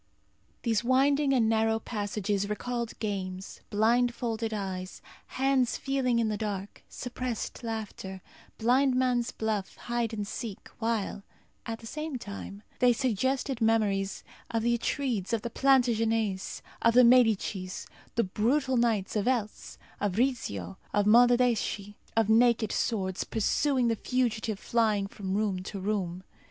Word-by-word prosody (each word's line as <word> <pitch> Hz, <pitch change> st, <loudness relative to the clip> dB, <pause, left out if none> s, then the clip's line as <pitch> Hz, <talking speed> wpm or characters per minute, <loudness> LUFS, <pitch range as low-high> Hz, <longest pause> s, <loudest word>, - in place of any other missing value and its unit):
These 225 Hz, -2 st, +1 dB
winding 275 Hz, +3 st, +3 dB
and 245 Hz, -4 st, +3 dB
narrow 225 Hz, 0 st, +2 dB
passages 205 Hz, -2 st, -2 dB
recalled 235 Hz, +2 st, -3 dB
games, 190 Hz, -3 st, -4 dB
blindfolded 230 Hz, +1 st, +1 dB
eyes, 190 Hz, -3 st, -4 dB, 0.3 s
hands 265 Hz, -2 st, +1 dB
feeling 265 Hz, -3 st, 0 dB
in 230 Hz, -1 st, +2 dB
the 210 Hz, -1 st, -1 dB
dark, 205 Hz, -2 st, -4 dB
suppressed 245 Hz, -2 st, -5 dB
laughter, 210 Hz, -4 st, -5 dB, 0.3 s
blind 255 Hz, +3 st, +3 dB
man's 250 Hz, -2 st, +1 dB
buff, 215 Hz, -3 st, -2 dB
hide 240 Hz, -1 st, -2 dB
and 210 Hz, -2 st, -3 dB
seek, 215 Hz, 0 st, -6 dB
while, 225 Hz, -3 st, -1 dB, 0.5 s
at 225 Hz, 0 st, -4 dB
the -, -, -11 dB
same 305 Hz, +3 st, -4 dB
time, 100 Hz, -, -8 dB, 0.2 s
they 250 Hz, -1 st, +5 dB
suggested 260 Hz, +1 st, 0 dB
memories 205 Hz, -4 st, +1 dB, 0.3 s
of 225 Hz, -1 st, -1 dB
the 235 Hz, 0 st, +3 dB
Atrides, 235 Hz, -4 st, -1 dB
of 225 Hz, -, 0 dB
the 235 Hz, -, -4 dB
Plantagenets, 225 Hz, -7 st, +1 dB, 0.2 s
of 230 Hz, 0 st, +4 dB
the 250 Hz, -, +8 dB
Médicis, 220 Hz, -6 st, +3 dB, 0.3 s
the 230 Hz, -, +3 dB
brutal 255 Hz, +7 st, +1 dB
knights 225 Hz, -5 st, +1 dB
of 210 Hz, +1 st, 0 dB
Eltz, 230 Hz, -5 st, -2 dB, 0.2 s
of 200 Hz, -2 st, -1 dB
Rizzio, 100 Hz, -, -1 dB, 0.2 s
of 205 Hz, -1 st, +2 dB
Monaldeschi; 235 Hz, -3 st, +3 dB, 0.2 s
of 225 Hz, -2 st, +4 dB
naked 230 Hz, 0 st, +4 dB
swords, 190 Hz, -5 st, -1 dB
pursuing 255 Hz, +3 st, +1 dB
the 230 Hz, -, +2 dB
fugitive 225 Hz, -3 st, -1 dB
flying 215 Hz, -2 st, +1 dB
from 195 Hz, -1 st, -4 dB
room 200 Hz, -3 st, 0 dB
to 195 Hz, +2 st, -6 dB
room. 185 Hz, -3 st, -2 dB
225 Hz, 135 wpm, -29 LUFS, 205-245 Hz, 0.5 s, the